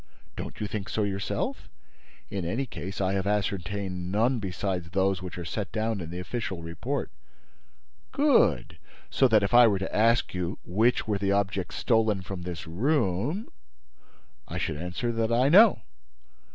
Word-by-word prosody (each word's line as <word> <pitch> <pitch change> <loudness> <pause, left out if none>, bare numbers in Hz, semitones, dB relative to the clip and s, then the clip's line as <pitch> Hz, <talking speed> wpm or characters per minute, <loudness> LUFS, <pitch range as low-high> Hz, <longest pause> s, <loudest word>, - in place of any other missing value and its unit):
"Don't - - -7
you 105 - -2
think 100 -1 -4
so 110 - 0
yourself? 100 -1 -3 0.6
In 95 -2 -3
any 115 +11 -1
case, 95 -5 -7
I 95 -1 +1
have 100 0 -1
ascertained 95 -2 -2
none 115 +5 +2
besides 95 -3 -3
those 95 +1 +1
which 90 -2 -7
are 85 - -5
set 95 +2 -4
down 110 -2 -1
in 80 - -6
the 90 - -6
official 95 -2 -4
report." 85 0 -4 1.0
"Good! 290 0 +2 0.3
So 135 - +4
that, 110 -4 +4
if 100 - -1
I 120 -1 +8
were 100 -3 +2
to 95 0 -4
ask 115 +2 +3
you 90 +1 -3
which 110 +8 +1
were 105 -2 0
the 100 0 +1
objects 100 -2 -1
stolen 110 -4 +1
from 95 0 -6
this 85 -2 -6
room—" 125 - 0 1.0
"I - - -5
should - - -2
answer 90 +9 -3
that 115 0 -1
I 125 +4 +3
know." 205 +6 +7
100 Hz, 165 wpm, -27 LUFS, 90-115 Hz, 1.0 s, I